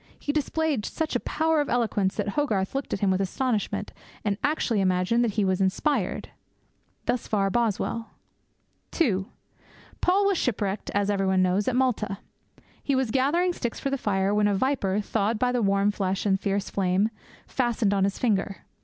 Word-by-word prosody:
He 290 - -2
displayed 300 -3 0
such 320 +7 -3
a - - +3
power 320 -1 +1
of 290 - -3
eloquence 215 -5 +1
that 205 -1 -1
Hogarth 205 -6 0
looked 275 0 -3
at - - -2
him 200 -2 +3
with 185 +1 +1
astonishment, 220 +3 -1 0.3
and 205 -1 +1
actually 275 -8 +1
imagined 185 +5 +2
that 225 -4 0
he 205 - +3
was 190 0 +1
inspired.' 195 - 0 0.8
Thus 250 - -1
far 195 -2 +1
Boswell. 230 0 -1 0.8
(2) 200 - +1 0.7
Paul 385 +3 +3
was 395 -3 +2
shipwrecked, 205 -4 -1
as 205 0 +2
everybody 190 -2 +2
knows, 185 +3 +1
at 255 - +1
Malta. 225 -6 0 0.6
He 280 - 0
was 260 -4 0
gathering 325 +8 +2
sticks 240 -8 -4
for 275 - -2
the - - +2
fire, 200 -5 0
when 210 0 +3
a 205 - +2
viper, 210 -4 +1
thawed 215 +1 0
by 250 +2 +1
the 250 -1 0
warm 200 0 +2
flesh 195 -1 -2
and 195 -2 +2
the - - -32
fierce 200 0 -1
flame, 195 +2 +1 0.4
fastened 235 -5 0
on 195 -1 +2
his 195 0 0
finger. 200 -4 0
210 Hz, 180 wpm, -26 LUFS, 195-260 Hz, 0.8 s, a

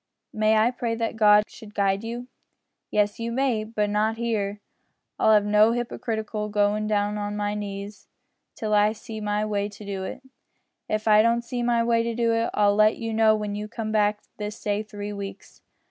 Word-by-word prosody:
May 215 0 +3
I 220 +3 +4
pray 235 -2 -2
that 230 0 -2
God 210 -1 +6
should 210 -3 -13
guide 195 0 +1
you?" 240 +2 -5 0.6
"Yes, 210 0 +1
you 230 0 -3
may, 250 -3 +1
but 215 -1 -2
not 215 +2 +1
here. 210 -3 -2 0.6
I'll 220 - +5
have 210 -1 +4
no 210 +2 +4
hypocritical 220 -3 -3
goin' 210 +1 +1
down 210 0 0
on 205 0 -3
my 205 0 -1
knees 200 -1 -6 0.5
till 215 -1 -2
I 210 +1 +4
see 220 0 -8
my 210 0 0
way 205 -1 -1
to 200 -2 -6
it. 260 - -7 0.7
If 215 +1 -1
I 215 0 +7
don't 235 +1 +2
see 245 +1 -4
my 235 -1 +2
way 230 0 +1
to 230 -1 +1
it, 230 0 +1
I'll 205 -1 +4
let 215 +1 +4
you 225 -1 -4
know 220 -1 +4
when 210 -1 -3
you 210 +1 -4
come 220 -1 -5
back 210 -1 +2 0.2
this 210 +1 -5
day 205 0 -1
three 205 -1 -7
weeks." 200 -1 -8
215 Hz, 190 wpm, -25 LUFS, 205-225 Hz, 0.7 s, I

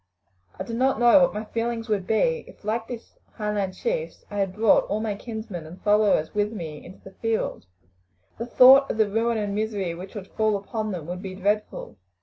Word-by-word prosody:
I - - -2
do 230 - -7
not 260 0 +1
know 240 +4 +7
what 265 - +4
my 215 +1 -4
feelings 230 +1 -3
would 200 -4 -1
be, 480 - +1
if, - - -16
like 225 +2 -1
these 235 -2 -9
Highland 210 -3 -2
chiefs, 485 0 -3
I 205 - -5
had 195 -2 -1
brought 220 0 +4
all 210 - -2
my 215 -1 -2
kinsmen 210 -6 -7
and 175 +4 -11
followers 205 -6 +3
with 210 0 0
me 160 -8 -7
into 185 - -14
the 190 - -11
field. 225 - -2 0.7
The 230 - -4
thought 265 +3 +7
of - - -2
the 220 -1 +3
ruin 225 +3 0
and 205 -2 -2
misery 205 -4 -2
which 185 +5 -9
would 195 -2 -7
fall 215 -1 +1
upon 215 +2 -4
them 175 -5 -5
would 180 +2 -5
be 190 -2 -6
dreadful. 200 - -2
215 Hz, 205 wpm, -25 LUFS, 195-230 Hz, 0.7 s, know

